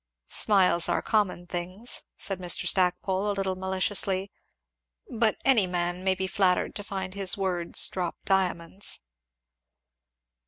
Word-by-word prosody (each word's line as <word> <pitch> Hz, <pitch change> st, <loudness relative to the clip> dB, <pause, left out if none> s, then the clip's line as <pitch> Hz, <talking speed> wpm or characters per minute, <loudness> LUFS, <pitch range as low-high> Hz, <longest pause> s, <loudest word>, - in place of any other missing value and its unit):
"Smiles 185 Hz, -5 st, +3 dB
are -, -, 0 dB
common 200 Hz, -5 st, 0 dB
things," 185 Hz, +6 st, -3 dB
said 195 Hz, -2 st, -3 dB
Mr. 180 Hz, -2 st, +2 dB
Stackpole 185 Hz, +2 st, +1 dB
a -, -, +1 dB
little 190 Hz, -1 st, -1 dB
maliciously; 190 Hz, +1 st, 0 dB, 0.8 s
"but 225 Hz, -1 st, 0 dB
any 235 Hz, -8 st, +4 dB
man 175 Hz, 0 st, -2 dB
may 190 Hz, 0 st, +2 dB
be 190 Hz, 0 st, -2 dB
flattered 185 Hz, -1 st, +1 dB
to 205 Hz, -, -5 dB
find 190 Hz, -2 st, -5 dB
his 195 Hz, -1 st, +1 dB
words 180 Hz, -3 st, +1 dB
drop 180 Hz, -2 st, -3 dB
diamonds." 190 Hz, -, 0 dB
190 Hz, 125 wpm, -27 LUFS, 180-200 Hz, 0.8 s, any